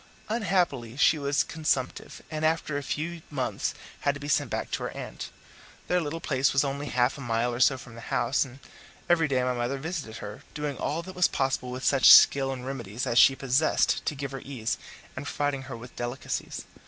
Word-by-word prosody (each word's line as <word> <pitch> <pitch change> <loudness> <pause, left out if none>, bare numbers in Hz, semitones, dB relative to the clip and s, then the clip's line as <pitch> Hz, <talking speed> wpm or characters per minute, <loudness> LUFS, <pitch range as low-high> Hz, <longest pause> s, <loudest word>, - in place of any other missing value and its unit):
Unhappily 175 - 0
she 155 +2 +4
was 140 0 +1
consumptive, 150 -5 -2
and 155 0 -3
after 155 -2 +1
a 145 - -1
few 165 +4 -4
months 130 -4 -2 0.2
had 140 0 +1
to - - -7
be 145 - -7
sent 145 - +1
back - - -3
to - - -2
her - - -2
aunt. - - -6 0.6
Their 180 0 +2
little 160 +1 -3
place 135 -4 +1
was 140 - +4
only 140 +1 -3
half 125 +2 +1
a - - -7
mile 120 0 0
or 120 - -4
so 130 +1 +5
from 120 -2 -12
the 115 - -10
house, 135 - +1
and 130 -2 -11 0.5
every 165 -2 +4
day 130 -3 +1
my 125 0 +1
mother 120 +3 -2
visited 145 -6 -5
her, 105 - -8
doing 150 -2 -3
all 160 +5 -2
that 185 +2 -9
was 180 -1 +4
possible 135 -1 -1
with 130 +1 -5
such 135 -3 +7
skill 135 -1 +7
and 130 -1 -6
remedies 120 -4 -4
as 120 - +3
she 135 - +7
possessed 135 +4 +2
to 150 - 0
give 140 -1 -5
her 135 -1 -6
ease, 120 -5 -3 0.4
and 145 - -6
providing 140 -2 -2
her 120 - -5
with 120 +2 -12
delicacies. 120 +2 -4
135 Hz, 210 wpm, -27 LUFS, 125-150 Hz, 0.6 s, such